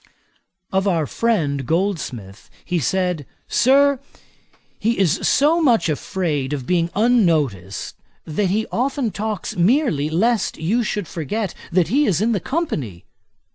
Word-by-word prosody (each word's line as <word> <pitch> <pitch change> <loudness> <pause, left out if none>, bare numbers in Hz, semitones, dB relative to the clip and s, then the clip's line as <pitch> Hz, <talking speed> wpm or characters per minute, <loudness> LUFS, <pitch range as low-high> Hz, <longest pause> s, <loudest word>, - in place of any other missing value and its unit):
Of 190 +1 +1
our 165 -5 +1
friend, 155 -11 0
Goldsmith, 140 - -3 0.2
he 180 -2 0
said, 180 +1 0 0.2
'Sir, 275 +1 +4 0.8
he 230 +2 0
is 185 -6 +2
so 315 +4 +3
much 230 - +3
afraid 150 -3 -2
of 135 -4 -4
being 170 +2 +1
unnoticed, 155 - +1 0.3
that 175 +6 -1
he 210 +4 0
often 260 -1 -1
talks 215 0 -4
merely 190 - +2
lest 215 +6 +1
you 190 +10 0
should 205 -5 -2
forget 195 +5 -3 0.2
that 175 -1 +2
he 285 +5 +3
is 175 -5 +2
in 225 +3 +1
the 210 - +1
company.' 165 - -3
190 Hz, 135 wpm, -21 LUFS, 155-230 Hz, 0.8 s, Sir